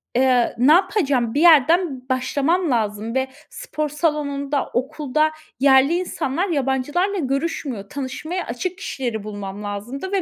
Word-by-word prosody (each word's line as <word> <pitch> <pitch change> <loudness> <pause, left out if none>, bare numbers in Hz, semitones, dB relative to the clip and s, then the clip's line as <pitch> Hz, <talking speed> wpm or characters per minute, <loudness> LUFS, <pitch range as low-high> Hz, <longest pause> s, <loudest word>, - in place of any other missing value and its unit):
eee, 250 -1 +3
ne 255 +5 +5
yapacağım? 290 - +2
Bir 290 - +1
yerden 315 -4 +4
başlamam 280 +6 +1
lazım 220 0 -1
ve 265 0 +1 0.2
spor 305 -11 -4
salonunda, 290 -2 -1
okulda 300 +3 0 0.3
yerli 270 +2 +5
insanlar 345 0 -2
yabancılarla 295 +7 0
görüşmüyor. 275 - -3
Tanışmaya 300 +6 -4
açık 335 +11 -4
kişileri 245 - -4
bulmam 205 -1 -6
lazımdı 230 - -5
ve 395 -1 +1
275 Hz, 125 wpm, -21 LUFS, 250-325 Hz, 0.3 s, ne